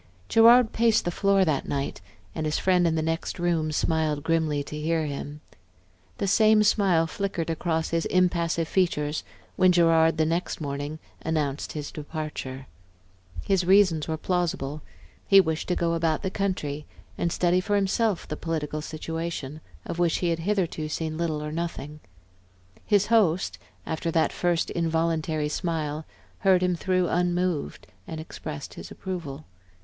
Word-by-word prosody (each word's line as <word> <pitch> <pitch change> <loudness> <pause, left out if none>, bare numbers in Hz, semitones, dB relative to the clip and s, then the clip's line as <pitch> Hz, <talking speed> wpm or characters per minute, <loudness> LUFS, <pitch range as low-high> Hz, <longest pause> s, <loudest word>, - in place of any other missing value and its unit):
Gerard 230 +1 +6
paced 230 -1 +3
the 175 - 0
floor 195 +1 +3
that 150 -5 0
night, 140 -8 -3 0.3
and 155 - -2
his 150 - 0
friend 180 -2 +3
in 160 - +1
the 160 - 0
next 165 +1 -2
room 170 -3 0
smiled 155 -1 0
grimly 160 -3 +1
to 150 - -8
hear 160 +1 0
him. 145 +1 -6 0.8
The - - -1
same 215 +2 +5
smile 195 -6 +3
flickered 170 -1 -3
across 160 0 -1
his 165 0 0
impassive 170 -3 +1
features 155 -5 0 0.3
when 185 0 +5
Gerard, 165 -2 +4
the 155 - +3
next 165 +3 -1
morning, 145 0 -4 0.2
announced 150 -3 -2
his 150 -2 -5
departure. 150 -4 -6 0.8
His 190 -2 +2
reasons 185 -4 +4
were 160 -1 -2
plausible; 155 -5 -2 0.5
he 195 - +8
wished 160 -4 0
to 180 - +1
go 170 -1 0
about 165 0 0
the 190 - -1
country 155 -8 -2 0.3
and 170 - -1
study 180 +1 +2
for 205 +2 0
himself 200 0 +1
the 150 - -4
political 155 -2 -3
situation 160 -2 -5 0.2
of 170 - -5
which 170 -2 +2
he 175 - 0
had 165 -1 0
hitherto 170 -4 -1
seen 155 0 -3
little 155 -2 -2
or 150 - -4
nothing. 155 -2 -5 0.9
His 205 -1 +4
host, 175 - +2 0.3
after 160 +1 -2
that 165 -1 +1
first 175 -2 0
involuntary 160 -2 0
smile, 155 -2 -3 0.3
heard 185 -2 +4
him 180 -1 +2
through 185 +1 +1
unmoved 175 - -1 0.2
and 160 - -6
expressed 155 -2 -7
his - - -9
approval. 160 -6 -6
165 Hz, 155 wpm, -26 LUFS, 155-180 Hz, 0.9 s, he